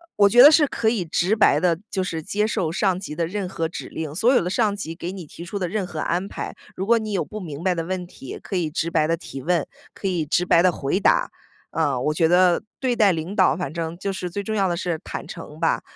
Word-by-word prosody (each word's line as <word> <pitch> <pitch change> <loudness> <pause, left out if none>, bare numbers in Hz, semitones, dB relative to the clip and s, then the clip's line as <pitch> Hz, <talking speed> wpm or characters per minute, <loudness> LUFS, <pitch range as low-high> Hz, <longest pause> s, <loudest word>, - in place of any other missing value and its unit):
我 200 -1 +5
觉 240 +4 +7
得 285 - +11
是 305 -1 +5
可 235 -5 -2
以 220 -4 +2
直 175 +5 +1
白 215 - +4
地 175 -2 +2
就 190 - -1
是 165 -4 -3
接 210 +6 0
受 190 -8 -1
上 190 +1 +1
级 185 -4 -7
的 165 +1 -1
任 195 +1 -3
何 165 -3 -2
指 160 - -7
令。 155 -2 -5
所 235 +9 +3
有 - - +4
的 180 - -2
上 210 +1 +1
级 165 -5 -6
给 175 +1 -5
你 190 -3 -8
提 165 - -10
出 195 +4 -5
的 180 - -1
任 195 +2 -2
何 160 -3 -6
安 175 +4 -1
排， - - -6 0.2
如 190 - -2
果 235 +3 +4
你 215 -1 -4
有 195 - 0
不 215 0 -7
明 155 -4 -7
白 180 0 +1
的 165 - -2
问 180 +1 -4
题， 135 -6 -9
可 - - -5
以 170 -4 0
直 165 +1 -1
白 160 -2 +2
地 165 +2 0
提 135 -5 -8
问， 170 +2 0 0.3
可 195 - -4
以 175 -4 0
直 175 +4 +1
白 170 - +5
地 185 - +5
回 140 +1 -1
答。 200 - +3 0.4
呃， 135 -3 0
我 150 +5 0
觉 165 +2 +2
得 180 0 +4 0.2
对 255 -2 0
待 210 -4 +5
领 165 +3 -4
导， 185 -10 +4
反 170 -5 -4
正 165 0 -4
就 195 +2 -3
是 180 -1 -4
最 200 +4 -4
重 215 +2 -3
要 195 -3 +2
的 175 - -1
是 170 -2 -2
坦 - - -6
诚 160 -3 -9
吧， 165 - +1
180 Hz, 295 characters per minute, -23 LUFS, 165-200 Hz, 0.4 s, 得